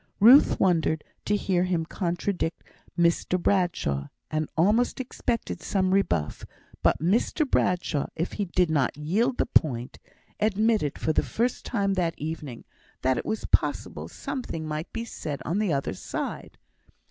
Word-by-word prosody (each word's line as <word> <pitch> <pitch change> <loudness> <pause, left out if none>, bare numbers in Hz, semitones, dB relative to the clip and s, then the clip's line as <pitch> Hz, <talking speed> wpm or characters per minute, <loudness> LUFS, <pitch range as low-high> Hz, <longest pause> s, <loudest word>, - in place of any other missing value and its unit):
Ruth 245 +8 +7
wondered 160 -4 +2 0.2
to 210 - +2
hear 185 -3 +1
him 175 -3 0
contradict 175 0 -2 0.3
Mr 170 +1 +2
Bradshaw, 175 - 0 0.2
and 155 -1 -1
almost 215 +11 +3
expected 245 -2 -3
some 185 -2 +1
rebuff; 85 - 0 0.4
but - - +3
Mr 220 - +1
Bradshaw, 180 - +1
if 165 +3 -2
he 205 - -2
did 180 -2 +1
not 140 -3 +1
yield 210 - 0
the - - +2
point, 130 - +1 0.4
admitted, 215 -6 +1
for 155 - 0
the - - +3
first 240 +2 -1
time 200 -4 0
that 175 -3 0
evening, 150 -5 -6 0.4
that 130 -1 +2
it - - -6
was 220 - -2
possible - - 0
something 165 - -5
might 155 +2 -4
be 230 0 -4
said 150 -10 -5
on 175 +6 0
the 210 -5 +1
other 140 -7 -1
side. 95 - -5
175 Hz, 145 wpm, -26 LUFS, 155-210 Hz, 0.4 s, Ruth